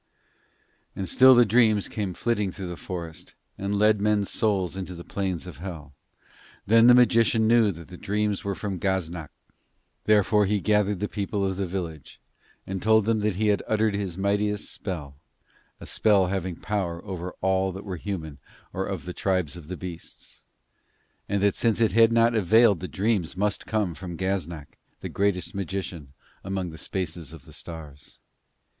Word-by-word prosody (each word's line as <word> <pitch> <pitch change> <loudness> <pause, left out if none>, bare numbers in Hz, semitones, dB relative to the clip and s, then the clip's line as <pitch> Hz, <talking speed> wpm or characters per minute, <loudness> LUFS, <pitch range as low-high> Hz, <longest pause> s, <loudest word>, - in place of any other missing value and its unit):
And 95 - -4
still 130 +5 +7
the 120 0 +6
dreams 110 -2 +3
came 100 -5 -4
flitting 105 -5 0
through 95 -1 -6
the 90 - -5
forest, 85 -2 -7 0.2
and 100 +1 -2
led 105 0 +4
men's 105 -1 +1
souls 95 -5 0
into 95 -1 -5
the 85 - -9
plains 95 -3 -3
of 90 -7 -9
Hell. 80 -5 -8 0.7
Then 115 +3 +6
the 125 - +9
magician 115 -2 +4
knew 115 -2 +5
that 85 -2 -11
the 90 - -10
dreams 105 0 -1
were 100 -1 -2
from 100 -3 -4
Gaznak. 90 -5 -2 0.8
Therefore 105 -1 +4
he 105 +1 +1
gathered 105 -1 +1
the 105 - 0
people 100 -1 -2
of 95 -1 -1
the 95 -1 -1
village, 85 -5 -6 0.5
and 95 -1 -4
told 110 -1 +4
them 110 0 +2
that 105 -2 0
he 105 +2 +1
had 100 - +2
uttered 110 -1 +1
his 100 -4 -3
mightiest 105 +1 0
spell 75 -8 -6 0.6
a - - -10
spell 105 -4 +3
having 95 -2 -2
power 90 -3 -3
over 90 -2 -6
all 95 0 +1
that 95 +3 -8
were 95 -3 -4
human 80 -7 -5 0.3
or - - -2
of - - -5
the - - -5
tribes 90 -6 -1
of 85 -4 -11
the 90 +1 -5
beasts; 90 -3 -9 0.9
and 100 0 0
that 100 - +4
since 115 -2 +1
it 115 -2 +3
had 115 0 +5
not 115 0 +4
availed 110 -1 +4
the 90 - -5
dreams 95 -4 -1
must 100 +1 -1
come 105 -5 0
from 85 +2 -7
Gaznak, 85 -6 -4 0.2
the - - -5
greatest 100 -3 0
magician 95 -7 -5 0.3
among 95 -2 -3
the 80 - -11
spaces 85 -4 -4
of 80 -5 -12
the - - -15
stars. 75 -4 -10
95 Hz, 175 wpm, -26 LUFS, 90-105 Hz, 0.9 s, the